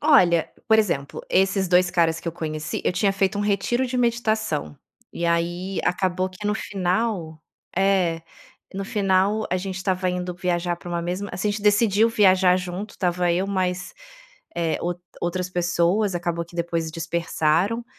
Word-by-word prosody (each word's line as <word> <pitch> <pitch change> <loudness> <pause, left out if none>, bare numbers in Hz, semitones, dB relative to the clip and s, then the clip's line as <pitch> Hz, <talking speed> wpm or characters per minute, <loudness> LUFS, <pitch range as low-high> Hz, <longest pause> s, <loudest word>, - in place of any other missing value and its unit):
Olha, 180 - +4 0.2
por 220 - +6
exemplo, 140 -10 -1
esses 190 0 +2
2 180 0 +4
caras 165 -2 +2
que 170 - -4
eu - - -3
conheci, 155 -2 -4
eu - - +2
tinha 195 +2 +2
feito 195 +1 0
um - - -1
retiro 205 +5 +1
de 250 - -3
meditação, 220 - 0 0.3
e 170 - -2
aí, 175 +3 -1
acabou 185 0 0
que 185 +3 -7
no 210 - +1
final 185 -5 -2 0.3
é, 185 -4 +2 0.5
no 195 - -3
final 200 +1 +1
a 185 - +2
gente 190 0 -4
estava 185 -1 -1
indo 180 0 -2
viajar 175 -1 -1
pra 175 - -11
uma 170 -1 -2
mesma 180 +4 -3
assim, 180 +4 -1
a - - +2
gente 205 0 -5
decidiu 210 +1 +4
viajar 190 -4 +4
junto, 185 +3 -5
estava 180 -1 0
eu 185 +3 0
mais, 185 -2 -1 0.6
eh, 165 -2 0
ou 175 +1 -1 0.3
outras 180 +1 -2
pessoas, 175 +3 +1
acabou 170 -1 -2
que 170 +1 -18
depois 165 -1 -1
dispersaram, 170 +5 0
185 Hz, 165 wpm, -23 LUFS, 170-200 Hz, 0.6 s, por